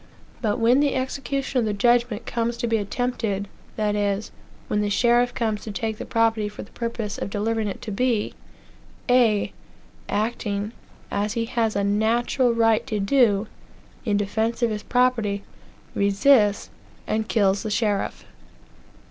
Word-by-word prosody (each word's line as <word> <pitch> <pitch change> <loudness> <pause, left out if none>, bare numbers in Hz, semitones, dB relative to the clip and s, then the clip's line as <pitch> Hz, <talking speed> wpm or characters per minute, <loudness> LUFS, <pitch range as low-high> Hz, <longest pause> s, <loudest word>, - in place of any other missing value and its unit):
But 215 -2 0
when 240 +3 +4
the 290 -1 +2
execution 265 0 -2
of 235 - +1
that 210 -1 -2
judgment 240 0 +2
comes 235 0 -1
to 240 - -2
be 225 -1 +2
attempted 205 -2 -2 0.3
that 210 -1 0
is, 205 0 -1 0.4
when 210 - 0
the 205 - 0
sheriff 240 +3 +3
comes 220 -4 -1
to 215 - -6
take 220 +2 -3
the - - -6
property 225 -2 +1
for 210 - -8
the - - -16
purpose 230 -3 -4
of - - -3
delivering 220 +2 -1
it 195 - -6
to 215 - -5
B 230 0 0 0.7
A 240 -5 +3 0.6
acting, 210 -1 -1 0.4
as 205 +1 -1
he 230 0 -1
has 230 -2 0
a 200 - +1
natural 230 +5 +2
right 225 -1 +2
to 215 - -1
do, 205 -1 +3 0.6
in 210 -4 +1
defence 220 +4 -1
of 235 - +3
his 210 -1 -3
property, 230 -5 +1 0.5
resists 205 +1 +3 0.3
and 220 0 -1
kills 200 -3 +2
the 220 - -4
sheriff. 210 -2 -1
220 Hz, 155 wpm, -24 LUFS, 205-240 Hz, 0.7 s, when